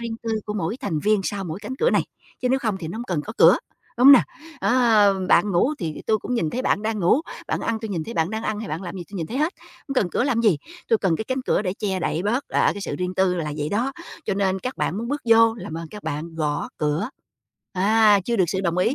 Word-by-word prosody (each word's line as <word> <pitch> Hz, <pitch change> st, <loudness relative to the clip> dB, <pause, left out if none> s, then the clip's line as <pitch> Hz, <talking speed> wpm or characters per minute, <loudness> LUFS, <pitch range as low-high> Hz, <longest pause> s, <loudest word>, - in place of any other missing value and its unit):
riêng 230 Hz, -1 st, -4 dB
tư 230 Hz, -, -3 dB, 0.2 s
của 210 Hz, -, -3 dB
mỗi 195 Hz, +2 st, -2 dB
thành 160 Hz, -, -2 dB
viên 210 Hz, +4 st, +2 dB
sau 200 Hz, 0 st, -3 dB
mỗi 165 Hz, 0 st, -5 dB
cánh 260 Hz, -, -5 dB
cửa 475 Hz, -, +2 dB
này, -, -, +2 dB, 0.4 s
chứ 250 Hz, -, +1 dB
nếu 265 Hz, -, +3 dB
không 220 Hz, -6 st, -1 dB
thì 160 Hz, -, -5 dB
nó 185 Hz, -, -6 dB
hông 240 Hz, -, -4 dB
cần 175 Hz, -9 st, -1 dB
có 215 Hz, -, -7 dB
cửa, -, -, +7 dB, 0.4 s
đúng 250 Hz, -, +5 dB
hông 280 Hz, -, +12 dB
nào? 265 Hz, -, +8 dB, 0.4 s
Ờ, 215 Hz, -6 st, +4 dB
bạn 205 Hz, -, +4 dB
ngủ 245 Hz, -, +2 dB
thì 160 Hz, -4 st, -5 dB
tôi 215 Hz, -, +2 dB
cũng 250 Hz, -, -4 dB
nhìn 165 Hz, -10 st, 0 dB
thấy 255 Hz, +8 st, -3 dB
bạn 205 Hz, -, +1 dB
đang 220 Hz, 0 st, -1 dB
ngủ, 180 Hz, -, +4 dB, 0.3 s
bạn -, -, -1 dB
ăn 230 Hz, -1 st, -1 dB
tôi 220 Hz, -, -5 dB
nhìn 165 Hz, -5 st, -2 dB
thấy 230 Hz, -, -7 dB
bạn 160 Hz, +2 st, 0 dB
đang 220 Hz, 0 st, -3 dB
ăn 215 Hz, -2 st, -2 dB
hay 225 Hz, -, -6 dB
bạn 160 Hz, +4 st, -4 dB
làm 175 Hz, -1 st, -6 dB
cái 190 Hz, -, -6 dB
gì, -, -, -6 dB
tôi 200 Hz, -, -7 dB
nhìn 165 Hz, -, -3 dB
thấy 245 Hz, +10 st, -4 dB
hết, 310 Hz, +4 st, +1 dB, 0.4 s
hông 275 Hz, -, -3 dB
cần 200 Hz, -9 st, +1 dB
cửa 240 Hz, -, 0 dB
làm 250 Hz, -4 st, +1 dB
gì. 200 Hz, -10 st, +3 dB, 0.3 s
Tôi 225 Hz, -, +4 dB
cần 185 Hz, -6 st, +1 dB
cái 220 Hz, -, -4 dB
cánh 260 Hz, +2 st, -2 dB
cửa 215 Hz, -, +1 dB
để 185 Hz, -, -1 dB
che 195 Hz, -3 st, -1 dB
đậy 165 Hz, 0 st, -1 dB
bớt, 235 Hz, +7 st, 0 dB
ờ, -, -, +2 dB
cái 205 Hz, -, -6 dB
sự -, -, -4 dB
riêng 180 Hz, 0 st, -2 dB
tư 190 Hz, -1 st, +2 dB
là 155 Hz, -4 st, -3 dB
vậy 150 Hz, 0 st, -1 dB
đó. 235 Hz, +9 st, -1 dB, 0.3 s
Cho 200 Hz, -, -1 dB
nên 190 Hz, -1 st, 0 dB
các 255 Hz, +5 st, -4 dB
bạn 185 Hz, -, -1 dB
muốn 235 Hz, +2 st, -4 dB
bước 290 Hz, +2 st, -2 dB
vô 225 Hz, 0 st, +6 dB
làm 205 Hz, -8 st, -7 dB
ơn 165 Hz, -1 st, -7 dB
các 210 Hz, +3 st, -10 dB
bạn 160 Hz, +2 st, -4 dB
gõ 150 Hz, -2 st, -2 dB
cửa. 150 Hz, +8 st, 0 dB, 0.6 s
À, 205 Hz, +2 st, +4 dB
chưa 235 Hz, +2 st, 0 dB
được 190 Hz, -, +4 dB
sự 190 Hz, +2 st, -1 dB
đồng 175 Hz, -2 st, -1 dB
ý 205 Hz, +8 st, +2 dB
205 Hz, 290 wpm, -23 LUFS, 175-230 Hz, 0.6 s, hông